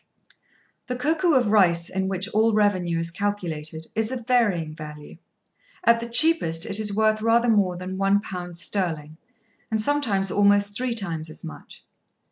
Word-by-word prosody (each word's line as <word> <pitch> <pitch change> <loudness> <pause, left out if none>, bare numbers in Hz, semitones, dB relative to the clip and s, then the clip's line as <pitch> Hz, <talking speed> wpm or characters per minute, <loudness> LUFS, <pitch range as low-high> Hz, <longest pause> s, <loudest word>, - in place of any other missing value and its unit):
The 250 - -3
koku 310 +5 +1
of 245 -5 +2
rice, 175 -5 +3
in 190 0 -2
which 190 +1 -2
all 220 +1 +2
revenue 185 -5 +1
is 165 0 -2
calculated, 165 -5 -4
is 220 +2 -1
of 245 -3 -5
varying 205 -11 +1
value. 150 -1 -10 0.7
At 235 -5 +4
the 235 0 -6
cheapest 235 - +3
it 200 - -1
is 210 -1 0
worth 215 0 +2
rather 230 +2 +3
more 195 -5 +2
than 185 +1 -6
a 195 +1 +3
pound 175 -3 -7
sterling, 160 -4 -3 0.5
and 220 -1 -1
sometimes 215 -7 0
almost 205 0 +3
three 250 0 -2
times 165 -7 -3
as 155 - -9
much. 160 - -11
200 Hz, 160 wpm, -24 LUFS, 170-225 Hz, 0.7 s, At